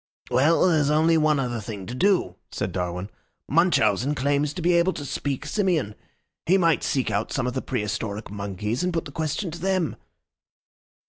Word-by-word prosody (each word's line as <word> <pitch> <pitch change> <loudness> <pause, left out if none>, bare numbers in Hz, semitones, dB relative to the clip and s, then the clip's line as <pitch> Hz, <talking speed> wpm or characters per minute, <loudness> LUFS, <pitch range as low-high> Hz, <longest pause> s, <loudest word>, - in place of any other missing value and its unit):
"Well, 140 +7 +4
then, 185 - +5
there's 150 -3 +2
only 160 +2 +4
one 155 -2 +3
other 120 -3 -2
thing 105 -3 -7
to 120 - -6
do," 190 +7 +2 0.2
said - - -3
Darwin. 90 +2 -3 0.4
"Munchausen 140 - +2
claims 140 +1 +1
to 180 - -4
be 175 +1 +3
able 170 +2 +3
to 145 - -6
speak 140 -1 -3
Simian. 175 - 0 0.5
He 185 +3 +5
might 165 -4 +3
seek 130 -2 0
out 100 +2 -1
some 135 - -1
of 125 - -2
the 130 - -2
prehistoric 105 -3 -3
monkeys 105 - -3
and 180 - 0
put 165 -2 -2
the - - -8
question 160 +4 -2
to 170 - -8
them." 185 -2 0
145 Hz, 185 wpm, -25 LUFS, 110-165 Hz, 0.5 s, then